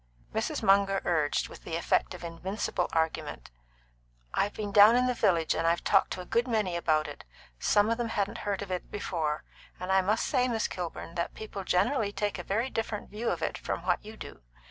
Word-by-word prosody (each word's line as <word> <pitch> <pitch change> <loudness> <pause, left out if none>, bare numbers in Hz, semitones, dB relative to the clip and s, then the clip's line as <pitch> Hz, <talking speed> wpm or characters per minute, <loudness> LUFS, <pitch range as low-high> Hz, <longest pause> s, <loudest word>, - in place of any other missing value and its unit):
Mrs. 225 +5 -1
Munger 195 -1 +4
urged, 155 -4 +1
with - - -12
the 165 - -4
effect 170 +2 +1
of 180 - -10
invincible 180 +2 -2
argument: 160 - -2 0.8
"I've 205 - 0
been 205 -1 -4
down 210 +3 +8
in 250 +1 +4
the 250 - +2
village, 170 -8 +2
and 165 - 0
I've 170 +1 +2
talked 195 -1 +4
to 185 - -5
a - - -9
good 235 +6 +1
many 215 -7 0
about 155 -3 +1
it - - -9 0.4
some 205 0 +3
of 230 - 0
them 235 -1 -1
hadn't 200 -1 -1
heard 200 -1 -2
of 190 - -8
it 180 - -3
before 160 -7 -2 0.4
and 185 +1 -3
I 190 0 +5
must 210 +4 +1
say, 255 -3 +2
Miss 225 -3 0
Kilburn, 170 -2 -6
that 170 0 -3
people 210 -2 -6
generally 205 +4 +1
take 205 -2 -2
a - - -4
very 225 +8 -1
different 225 -2 -3
view 225 +3 -2
of 165 -2 -2
it - - -2
from 170 - -4
what 180 -1 +1
you 215 +1 -10
do. - - -9
195 Hz, 210 wpm, -29 LUFS, 170-215 Hz, 0.8 s, down